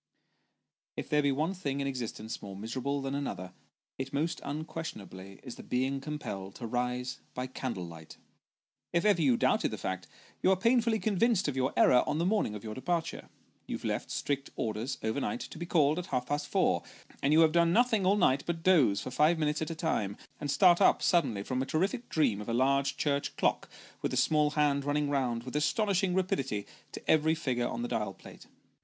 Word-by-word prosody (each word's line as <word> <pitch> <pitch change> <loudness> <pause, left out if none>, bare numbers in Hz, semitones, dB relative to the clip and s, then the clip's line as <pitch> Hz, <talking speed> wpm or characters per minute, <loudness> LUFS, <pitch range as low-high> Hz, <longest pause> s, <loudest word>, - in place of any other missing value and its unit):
If - - -5
there 150 0 +3
be 140 -1 +2
one 155 +7 0
thing 140 -7 -3
in 140 - -1
existence 120 -4 -4
more 100 -1 -8
miserable 130 +7 -3
than 135 0 -3
another, 95 -10 -4 0.5
it 135 0 -4
most 155 +4 -1
unquestionably 105 - -6
is 125 - -8
the - - -8
being 130 +2 -1
compelled 100 -10 -6
to 120 - -6
rise 125 +2 -2 0.2
by 125 - -2
candle 125 -7 -4
light. 80 -2 -11 0.8
If 170 0 +2
you 170 -10 +4
ever - - +1
doubted - - +2
the - - -5
fact, 95 -3 -4 0.3
you - - +3
are 190 - +5
painfully 230 +3 +3
convinced 215 -2 +2
of 145 - -2
your 130 +1 +1
error, 125 - +6
on 150 - 0
the 170 - +1
morning 195 - +1
of 105 - -8
your 110 -1 -5
departure. 165 +6 -3 0.4
You - - -3
left - - -2
strict 140 0 -2
orders, 110 +4 -2
overnight, 140 - -1
to 160 - -8
be 170 - -5
called 155 -1 +3
at 180 - -6
half 125 -2 -1
past 145 +2 -2
four, - - +2 0.4
and 140 - +2
you 160 +2 +6
have 160 -1 +5
done 170 0 +3
nothing 225 0 +3
all 195 +3 +3
night 140 -8 +3
but 165 -1 -3
doze 140 - +4
for 130 - -6
five 155 +6 +3
minutes 150 -1 0
at 160 - -2
a 165 - -4
time, 135 - -1 0.2
and 145 - -4
start 175 +5 +5
up - - +4
suddenly 115 - +2
from 130 +4 -2
a - - -1
terrific 195 - -1
dream 115 -10 +1
of 105 - -7
a 115 - 0
large 140 +2 +2
church 140 -1 -1
clock - - +1 0.3
with - - 0
the - - -2
small 150 -1 +3
hand 145 -2 +2
running 145 0 0
round, 125 -4 0
with 130 +2 -8
astonishing 190 +3 +1
rapidity, 135 - -1 0.3
to - - -9
every 160 +1 +4
figure 125 -7 -1
on 240 - -4
the - - -1
dial - - -2
plate. - - -14
140 Hz, 205 wpm, -30 LUFS, 125-170 Hz, 0.8 s, error